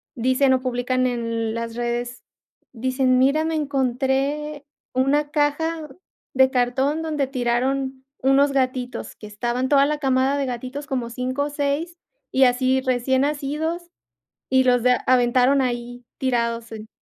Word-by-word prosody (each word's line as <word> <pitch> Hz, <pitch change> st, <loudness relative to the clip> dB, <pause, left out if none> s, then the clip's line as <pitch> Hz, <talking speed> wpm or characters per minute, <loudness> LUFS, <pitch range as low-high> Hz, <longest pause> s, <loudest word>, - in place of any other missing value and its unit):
dicen 260 Hz, +2 st, +2 dB
o 255 Hz, -, +1 dB
publican 255 Hz, 0 st, 0 dB
en 230 Hz, -2 st, -2 dB
las 230 Hz, 0 st, -4 dB
redes, 240 Hz, +1 st, -3 dB, 0.5 s
dicen: 255 Hz, +1 st, +1 dB
"Mira, 280 Hz, +4 st, +3 dB
me 320 Hz, 0 st, -1 dB
encontré 280 Hz, +1 st, -1 dB, 0.3 s
una 285 Hz, +3 st, +1 dB
caja 305 Hz, +1 st, 0 dB, 0.5 s
de 260 Hz, 0 st, +5 dB
cartón 265 Hz, +5 st, +1 dB
donde 300 Hz, -3 st, -1 dB
tiraron 260 Hz, +1 st, -1 dB, 0.2 s
unos 275 Hz, +2 st, +4 dB
gatitos, 255 Hz, -2 st, -2 dB
que -, -, -12 dB
estaban 240 Hz, +5 st, -2 dB
toda 280 Hz, -1 st, +5 dB
la 300 Hz, 0 st, -1 dB
camada 265 Hz, 0 st, +1 dB
de 280 Hz, -, 0 dB
gatitos 255 Hz, +4 st, -5 dB
como 255 Hz, -5 st, -2 dB
5 255 Hz, +3 st, -2 dB
o -, -, -3 dB
6 290 Hz, +4 st, -2 dB, 0.3 s
y 265 Hz, -, +4 dB
así 255 Hz, +1 st, +2 dB
recién 260 Hz, 0 st, +1 dB
nacidos 300 Hz, +4 st, -2 dB, 0.6 s
y 260 Hz, 0 st, +4 dB
los 245 Hz, -1 st, +3 dB
da 250 Hz, 0 st, +3 dB
aventaron 255 Hz, +2 st, +4 dB
ahí 245 Hz, 0 st, -4 dB
tirados 235 Hz, -3 st, -1 dB
en 220 Hz, 0 st, -8 dB
260 Hz, 140 wpm, -22 LUFS, 245-280 Hz, 0.6 s, de